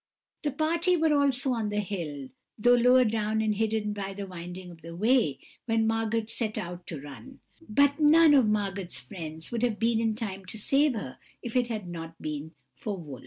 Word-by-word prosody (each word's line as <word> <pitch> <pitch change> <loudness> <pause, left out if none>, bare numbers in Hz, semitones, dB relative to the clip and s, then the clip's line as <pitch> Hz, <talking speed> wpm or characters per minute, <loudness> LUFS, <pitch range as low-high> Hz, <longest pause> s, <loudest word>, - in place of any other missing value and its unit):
"This 290 -3 -2
party 335 +4 +2
were 320 -1 +3
also 275 -2 +2
on 225 -3 -1
the 210 0 -1
hill, 160 -9 -4 0.3
though 245 +3 +5
lower 250 +1 +6
down 215 0 0
and 215 -1 +1
hidden 215 0 0
by 195 -1 -5
the 200 0 -5
winding 180 0 -8
of 165 -2 -14
the 165 +1 -9
way, 215 - +2 0.3
when 225 -1 +2
Margot 225 0 0
set 225 -1 -3
out 175 -3 -6
to 160 - -5
run; 145 - -11 0.3
but 280 +6 +3
none 310 +1 +7
of 265 -6 +5
Margot's 195 -9 -1
friends 160 +4 -8
would 235 -2 -2
have 240 -3 +1
been 230 0 +2
in 225 -1 +1
time 195 -4 -5
to 205 - -8
save 275 +5 +2
her, 135 - -6 0.2
if 240 0 -6
it 250 -1 +3
had 215 -5 -4
not 165 -1 -7
been 155 +1 -5 0.2
for 205 -3 -5
Wolf. 145 -7 -8
215 Hz, 200 wpm, -28 LUFS, 175-245 Hz, 0.3 s, none